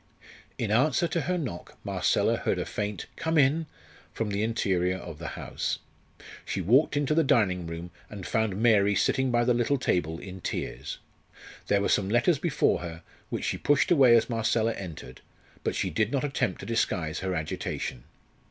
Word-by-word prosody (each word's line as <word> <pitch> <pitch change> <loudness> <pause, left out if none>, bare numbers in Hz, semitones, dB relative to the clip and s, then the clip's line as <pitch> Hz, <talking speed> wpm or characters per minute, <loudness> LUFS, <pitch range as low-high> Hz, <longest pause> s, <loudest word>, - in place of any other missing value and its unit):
In 110 -3 -2
answer 140 +8 +3
to 170 - 0
her 180 0 -1
knock 125 - -6
Marcella - - +1
heard - - -1
a - - -2
faint 105 -2 -4
"Come 160 0 0
in" 150 +3 +3 0.4
from 110 -2 -3
the 100 +1 -1
interior 95 -5 +1
of 80 -5 -9
the 80 -5 -6
house. - - -3 0.7
She - - -3
walked 125 - +3
into 145 +1 +1
the 165 +1 +4
dining 100 - +2
room, 85 +1 -6 0.2
and 100 -3 -8
found 110 -4 0
Mary 105 -3 +4
sitting 130 +6 +2
by 120 -1 +2
the 125 0 +3
little 120 +4 +1
table 80 -9 0
in 95 +1 -9
tears. - - -4 0.7
There 100 0 +3
were - - +1
some 95 -1 +2
letters 120 - +3
before 150 -2 +2
her, 85 -1 -7 0.3
which - - -3
she - - -1
pushed 145 +3 +2
away 135 -8 +7
as 115 - +1
Marcella 115 -1 +1
entered, 90 -7 -8 0.4
but - - -1
she - - -1
did 110 +1 +1
not 140 -1 0
attempt 135 -9 -1
to - - -7
disguise 90 -8 -1
her 95 -1 -2
agitation. 75 -5 -4
110 Hz, 180 wpm, -28 LUFS, 95-130 Hz, 0.7 s, away